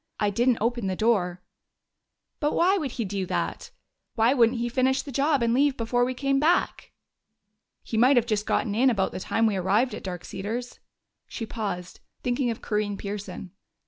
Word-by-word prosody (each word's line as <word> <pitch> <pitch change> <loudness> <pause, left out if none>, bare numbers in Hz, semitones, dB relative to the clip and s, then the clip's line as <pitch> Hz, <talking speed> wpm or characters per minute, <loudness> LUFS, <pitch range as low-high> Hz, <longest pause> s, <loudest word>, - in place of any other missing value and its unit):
I 205 -1 +1
didn't 240 +3 +2
open 235 -2 0
the 190 - -1
door." 180 -5 +1 1.0
"But 295 0 0
why 370 +3 +4
would 295 -10 -2
he 230 - -2
do 190 -1 -3
that? - - -3 0.5
Why 230 +3 +4
wouldn't 240 -2 +3
he 235 +1 -1
finish 260 +2 +1
the 285 - -8
job 280 0 +2
and 230 0 +2
leave 275 +1 +2
before 245 +1 +1
we 255 +1 -1
came 275 +1 +1
back?" 330 +5 +1 0.9
"He 225 - -4
might 255 +4 +5
have 240 - +4
just 215 -3 -1
gotten 215 -6 0
in 255 +5 +4
about 195 -6 0
the - - -5
time 225 +4 0
we 210 -3 +1
arrived 205 +8 +1
at - - -6
Dark 180 -2 -6
Cedars." 235 +5 -5 0.5
She 230 - -5
paused, 195 -6 -5 0.2
thinking 245 0 0
of 230 - -5
Corinne 210 -1 -1
Pearson. 200 -2 -6
230 Hz, 185 wpm, -26 LUFS, 205-255 Hz, 1.0 s, might